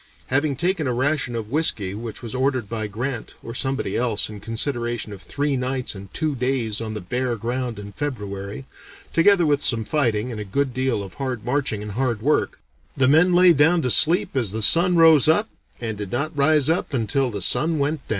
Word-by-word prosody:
Having 145 Hz, 0 st, +1 dB
taken 170 Hz, 0 st, -1 dB
a 125 Hz, -, 0 dB
ration 130 Hz, -1 st, -1 dB
of 110 Hz, -1 st, -5 dB
whiskey 115 Hz, -11 st, 0 dB
which 115 Hz, +3 st, -7 dB
was 115 Hz, -, -6 dB
ordered 130 Hz, -3 st, 0 dB
by 110 Hz, 0 st, -4 dB
Grant 120 Hz, +4 st, -5 dB
or 115 Hz, -, -7 dB
somebody 135 Hz, +2 st, -1 dB
else 115 Hz, -4 st, 0 dB
in 105 Hz, -, -9 dB
consideration 120 Hz, 0 st, -3 dB
of 95 Hz, -, -11 dB
three 145 Hz, +4 st, -2 dB
nights 130 Hz, 0 st, -2 dB
and 95 Hz, -2 st, -11 dB
two 155 Hz, -2 st, -1 dB
days 125 Hz, -4 st, -1 dB
on 110 Hz, -1 st, -5 dB
the 105 Hz, -, -5 dB
bare 125 Hz, +6 st, -2 dB
ground 120 Hz, +1 st, -3 dB
in 100 Hz, 0 st, -8 dB
February, 105 Hz, -4 st, -5 dB, 0.5 s
together 175 Hz, +1 st, +4 dB
with 145 Hz, -1 st, +1 dB
some 115 Hz, -5 st, +2 dB
fighting 120 Hz, -5 st, 0 dB
and 110 Hz, -2 st, -5 dB
a -, -, -3 dB
good 130 Hz, +6 st, -2 dB
deal 130 Hz, -5 st, -1 dB
of 95 Hz, -, -10 dB
hard 130 Hz, -5 st, -4 dB
marching 125 Hz, -5 st, -1 dB
and 105 Hz, -, -6 dB
hard 120 Hz, -1 st, -2 dB
work, 150 Hz, +3 st, +1 dB, 0.4 s
the 130 Hz, -, +3 dB
men 160 Hz, +6 st, +5 dB
lay 180 Hz, 0 st, +6 dB
down 160 Hz, +3 st, +3 dB
to 125 Hz, -, +1 dB
sleep 165 Hz, +5 st, +4 dB
as 120 Hz, -6 st, +1 dB
the 110 Hz, +1 st, -1 dB
sun 175 Hz, -, +6 dB
rose 160 Hz, -3 st, +6 dB
up, 205 Hz, +8 st, +3 dB, 0.3 s
and 110 Hz, -3 st, -4 dB
did 100 Hz, -3 st, -6 dB
not 145 Hz, +6 st, -2 dB
rise 145 Hz, 0 st, +3 dB
up 160 Hz, -3 st, 0 dB
until 125 Hz, +3 st, 0 dB
the 105 Hz, -3 st, -5 dB
sun 155 Hz, -, +1 dB
went 145 Hz, +2 st, -1 dB
down." -, -, -26 dB
130 Hz, 210 wpm, -22 LUFS, 110-145 Hz, 0.5 s, lay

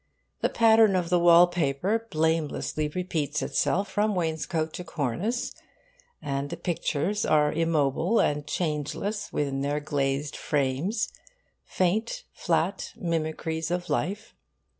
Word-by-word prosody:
The -, -, +2 dB
pattern 220 Hz, -3 st, +5 dB
of 180 Hz, -2 st, -1 dB
the 175 Hz, -, +4 dB
wallpaper 175 Hz, +4 st, +4 dB
blamelessly 155 Hz, -1 st, 0 dB
repeats 150 Hz, -3 st, -2 dB
itself 195 Hz, +2 st, +1 dB
from 210 Hz, +1 st, 0 dB
wainscote 160 Hz, -1 st, -1 dB
to 180 Hz, -, -5 dB
cornice; 170 Hz, -, -2 dB, 0.7 s
and 140 Hz, 0 st, -2 dB
the 170 Hz, -, -5 dB
pictures 175 Hz, +3 st, -1 dB
are 150 Hz, -1 st, +3 dB
immobile 165 Hz, -, +1 dB
and 145 Hz, 0 st, +1 dB
changeless 175 Hz, +6 st, -2 dB
within 135 Hz, -2 st, -1 dB
their 145 Hz, +1 st, 0 dB
glazed 145 Hz, -1 st, -1 dB
frames 145 Hz, -, -1 dB, 0.6 s
faint, 220 Hz, -, 0 dB
flat -, -, -1 dB
mimicries 160 Hz, -1 st, -2 dB
of 175 Hz, 0 st, -2 dB
life. 205 Hz, +4 st, -2 dB
165 Hz, 115 wpm, -27 LUFS, 150-185 Hz, 0.7 s, pattern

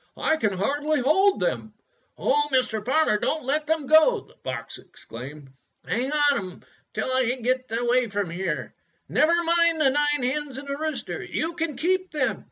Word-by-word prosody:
I 315 Hz, -, +2 dB
can 210 Hz, -9 st, 0 dB
hardly 290 Hz, +10 st, 0 dB
hold 385 Hz, +10 st, +3 dB
them." -, -, -2 dB, 0.4 s
"Oh, 295 Hz, +2 st, +1 dB
Mr. 245 Hz, -5 st, +1 dB
Farmer, 260 Hz, -3 st, +2 dB
don't 310 Hz, +5 st, -1 dB
let 300 Hz, +3 st, 0 dB
them 320 Hz, -2 st, 0 dB
go!" 315 Hz, -, +5 dB
the -, -, -21 dB
fox 115 Hz, -3 st, -5 dB
exclaimed. 135 Hz, +4 st, -11 dB, 0.4 s
"Hang 255 Hz, +4 st, -1 dB
on 300 Hz, 0 st, +1 dB
to -, -, +1 dB
them 180 Hz, -, -13 dB, 0.3 s
till -, -, -2 dB
I 260 Hz, 0 st, +2 dB
get 255 Hz, +1 st, -1 dB
away 240 Hz, +2 st, +1 dB
from 200 Hz, -4 st, -3 dB
here. 170 Hz, -, -3 dB, 0.3 s
Never 335 Hz, +3 st, +3 dB
mind 335 Hz, -1 st, +3 dB
the 275 Hz, -4 st, +4 dB
nine 295 Hz, -1 st, +1 dB
hens 275 Hz, +1 st, -2 dB
and 280 Hz, +1 st, -8 dB
the 280 Hz, -, -2 dB
rooster. 310 Hz, +1 st, -3 dB
You 330 Hz, +1 st, -3 dB
can 325 Hz, -3 st, -3 dB
keep 370 Hz, +2 st, 0 dB
them." 280 Hz, -4 st, -1 dB
280 Hz, 175 wpm, -25 LUFS, 235-315 Hz, 0.4 s, go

